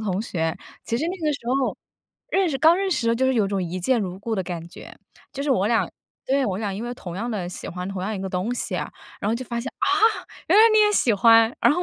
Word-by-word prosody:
同 200 -2 -1
学， 165 -7 -2 0.3
其 230 - -1
实 290 - -2
那 370 - -3
个 300 - +2
时 280 - -5
候 265 +1 0 0.5
认 385 -2 +2
识 275 - -1
刚 320 +5 +6
认 390 0 -1
识 - - +1
的 - - -1
时 230 - +1
候 230 - +3
就 260 +2 +1
是 260 - +2
有 215 -4 +2
种 195 -1 -1
一 180 +1 -4
见 240 +6 +2
如 185 -2 -4
故 220 +2 -3
的 190 - -1
感 170 -2 -6
觉， - - -12 0.4
就 280 -1 -4
是 290 - -1
我 205 -7 +2
俩 225 +1 +1 0.4
对， 275 +1 +1
我 190 -1 -2
俩 205 -2 -2
因 200 +3 -5
为 245 - -4
同 175 -7 -8
样 235 +5 -3
地 195 -6 -3
喜 180 - -7
欢 180 +1 -5
同 190 -2 -5
样 215 +3 -2
一 190 - -5
个 190 - -3
东 190 +6 -2
西 205 -5 -2
啊， 150 -3 -4 0.3
然 205 - -1
后 225 - +1
就 255 - -4
发 235 -1 -3
现， 270 - -5
啊， - - 0 0.6
原 - - +5
来 440 - +9
你 435 - +5
也 420 0 +4
喜 245 - +3
欢， 225 +3 +5
然 - - +5
后 355 - -1
225 Hz, 315 characters per minute, -23 LUFS, 190-260 Hz, 0.6 s, 来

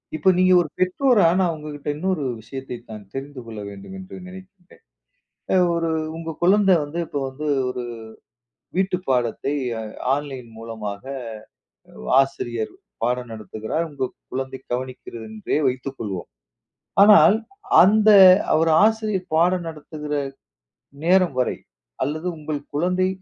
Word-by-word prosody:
இப்போ 190 - +3
நீங்க 185 0 +5
ஒரு 160 - -4
பெற்றோரா, 205 +3 +3
நான் 180 -3 +2
உங்ககிட்ட 150 -1 -7
இன்னொரு 180 0 -1 0.2
விஷயத்தை 130 +3 -7 0.2
நான் 105 -1 -8
தெரிந்து 135 -1 -6
கொள்ள 110 -2 -8
வேண்டும் 100 - -10
என்று 190 +1 -10
நினைக்கின்றேன். 190 0 -14 0.7
அ - - +4 0.2
ஒரு 165 -1 0 0.3
உங்க 165 0 -5
குழந்தை 195 +1 +5
வந்து, 145 +4 -6
இப்போ 145 - -3
வந்து 145 +3 -6 0.2
ஒரு 125 - -4 0.9
வீட்டு 190 -1 +1
பாடத்தை 125 +1 0 0.3
அ - - -5 0.3
ஆன்லைன் 135 -4 -6
மூலமாக, 110 -2 -6 1.2
ஆசிரியர் 120 -4 -2 0.3
பாடம் 125 0 -1
நடத்துகிறார், 110 +8 -4
உங்கள் 135 -3 -3 0.2
குழந்தை 130 0 -4
கவனிக்கிறது 125 -2 -5
என்றே 110 +6 -2
வைத்துக்கொள்வோம். 125 -8 -4 0.8
ஆனால் 205 -3 +8 0.5
அந்த 215 +3 +5 0.5
ஒரு 165 -1 +3
ஆசிரியர் 215 -4 0
பாடம் 175 +1 +2
நடத்துகிற 150 -1 -8 0.9
நேரம் 180 -4 +4
வரை, 125 - 0 0.5
அல்லது 155 +6 -3
உங்கள் 150 -1 -4
குழந்தை 180 +4 +1
150 Hz, 120 wpm, -22 LUFS, 125-185 Hz, 1.2 s, ஆனால்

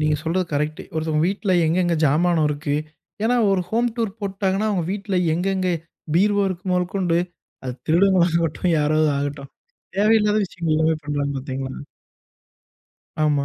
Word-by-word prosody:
நீங்க 150 0 +2
சொல்றது 175 +2 0
கரெக்ட்டு. 150 +1 -2
ஒருத்தவங்க 160 0 0
வீட்ல 200 -1 -1
எங்கெங்கே 175 0 +1
ஜாமானம் 160 +2 +3
இருக்கு. 145 0 -2 0.5
ஏன்னா 240 +3 +2
ஒரு 195 -2 +2
ஹோம் 235 +2 +2
டூர் 225 -3 -2
போட்டுட்டாங்கன்னா, 195 +1 -1
அவங்க 180 -5 0
வீட்ல 200 -2 -3 0.2
எங்கெங்கே 185 0 0 0.4
பீர்வோ 200 +3 +3
இருக்கு 180 -1 -6
மொதக்கொண்டு, 180 -1 0 0.5
அது 125 -1 -4
திருடர்களாகட்டும் 170 -1 +2
யாராவதாகட்டும். 145 -2 0 0.5
தேவையில்லாத 210 0 +4
விஷயங்கள் 170 -3 -2
எல்லாமே 160 +1 +2
பண்றாங்க 145 -1 -1
பார்த்தீங்களா? 130 -1 -5 1.4
ஆமா. 145 -2 +2
170 Hz, 125 wpm, -22 LUFS, 150-195 Hz, 1.4 s, தேவையில்லாத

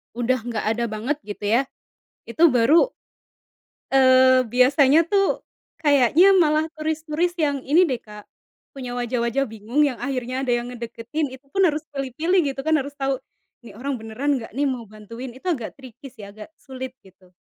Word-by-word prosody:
udah 245 +2 +1
nggak 230 -3 -3
ada 235 - 0
banget 230 +7 -3
gitu 205 0 -8
ya, 230 +5 +3 0.7
itu 315 +9 -1
baru, 295 - +4 1.0
eee, 260 -1 +5
biasanya 270 +6 +4
tuh, 395 -1 +1 0.4
kayaknya 290 +7 +5
malah 310 -1 +3
turis 315 0 -3
turis 340 +3 -1
yang 290 -4 0
ini 335 +6 +5
deh 255 -8 -1
Kak, 210 -2 -12 0.5
punya 250 -3 -7
wajah-wajah 240 +2 -1
bingung 225 +7 -1
yang 265 -5 -1
akhirnya 255 -2 -3
ada 250 - -1
yang 240 +1 -4
ngedeketin 240 +5 -4
itu 270 +2 -21
pun 390 - 0
harus 305 0 -2
pilih-pilih 290 +7 0
gitu 270 - -10
kan 315 0 +2
harus 280 +1 -6
tahu, 270 -1 -1 0.4
ini 215 -4 -13
orang 260 +1 -4
beneran 255 +5 -2
enggak 225 - -10
nih 285 - 0
mau 245 -5 -4
bantuin 230 +4 -9
itu 270 - -10
agak 240 -8 -4
tricky 265 +2 -12
sih 220 -5 -13
agak 210 +1 -11
sulit 260 -1 -8
gitu. 185 -1 -22
260 Hz, 170 wpm, -23 LUFS, 235-290 Hz, 1.0 s, eee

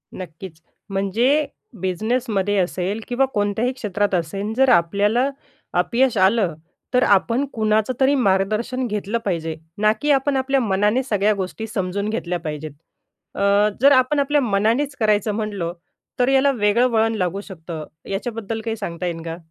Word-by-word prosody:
नक्कीच. 170 -2 -9 0.3
म्हणजे 225 +10 +1 0.4
बिझनेसमध्ये 205 +1 0
असेल 185 +3 -1
किंवा 250 +2 +2
कोणत्याही 205 +4 0
क्षेत्रात 205 -5 -2
असेल. 195 +5 -2
जर 265 0 +4
आपल्याला 205 +9 +3 0.4
अपयश 235 +7 +2
आलं 190 -1 +3 0.4
तर 250 0 +4
आपण 230 +7 +3
कुणाचं 215 +2 +1
तरी 270 +1 +4
मार्गदर्शन 215 +3 +1
घेतलं 210 +1 -2
पाहिजे. 165 -4 -2 0.2
ना 215 +1 +4
की 295 - +2
आपण 275 0 +2
आपल्या 270 +1 +1
मनाने 210 +3 +1
सगळ्या 210 -4 +1
गोष्टी 195 +3 -4
समजून 200 0 -2
घेतल्या 180 -5 -2
पाहिजेत. 155 -2 -5 0.6
अ, 200 +1 +3
जर 280 +2 +7
आपण 260 +2 +4
आपल्या 290 +1 +2
मनानेच 235 +6 +1
करायचं 215 -1 +2
म्हणलो, 200 -6 -3 0.5
तर 250 - +3
याला 270 +1 +4
वेगळं 230 0 +2
वळण 225 0 +2
लागू 190 -1 -1
शकतं. 165 -5 -8 0.2
याच्याबद्दल 225 +1 -4
काही 225 0 -3
सांगता 175 -4 -5
येईल 170 -2 -3
का? 165 0 -5
210 Hz, 145 wpm, -21 LUFS, 190-245 Hz, 0.6 s, जर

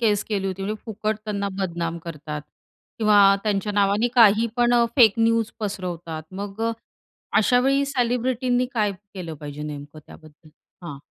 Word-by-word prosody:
केस 210 -3 +2
केली 200 -2 -1
होती. 190 0 -4
म्हणजे 210 +2 -4
फुकट 215 0 -2
त्यांना 200 -2 -2
बदनाम 170 -3 -2
करतात 150 -2 -6 0.6
किंवा 210 -2 +5 0.2
त्यांच्या 210 -1 -1
नावाने 205 +3 +2
काही 225 -1 +6
पण 240 0 +3
अ, 235 -1 +5
फेक 225 -5 +7
न्यूज 230 -1 +2
पसरवतात. 175 -5 -4 0.2
मग 205 +1 -6
अ, - - 0 0.7
अशावेळी 265 +5 +3
सेलिब्रिटींनी 250 -1 0
काय 210 -3 +1
केलं 185 -4 -9
पाहिजे 150 0 -7
नेमकं 145 0 -8
त्याबद्दल? 155 0 -16 0.4
हां. 145 -5 -7
205 Hz, 145 wpm, -23 LUFS, 170-230 Hz, 0.7 s, फेक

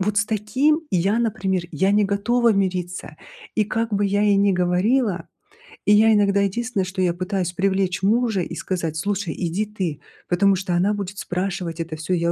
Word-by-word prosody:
вот 205 +2 -1
с 205 - +1
таким 255 +10 +1
я, 195 +5 +1
например, 195 -5 -1
я 195 +1 +1
не 210 - +4
готова 230 +4 +2
мириться. 180 -3 -2 0.4
И 215 - +2
как 225 +2 -2
бы 205 - +1
я 205 +1 +1
ей 205 -1 +4
ни 200 0 +3
говорила, 185 +4 +1 0.6
и 205 - +5
я 220 +1 +6
иногда 200 -1 +3
единственное, 200 +1 -1
что 185 +1 -4
я 180 -2 +2
пытаюсь 185 0 -2
привлечь 190 -1 0
мужа 220 -1 +2
и - - -5
сказать: 165 -4 -3
"Слушай, 200 -2 -2
иди 180 +4 -1
ты, 190 -8 -4 0.3
потому 195 +2 +3
что 185 -1 -2
она 190 +4 +2
будет 200 -1 -5
спрашивать 180 -2 -3
это 165 -1 -4
всё, 160 +4 -3
я 170 -1 +1
195 Hz, 185 wpm, -22 LUFS, 180-210 Hz, 0.6 s, я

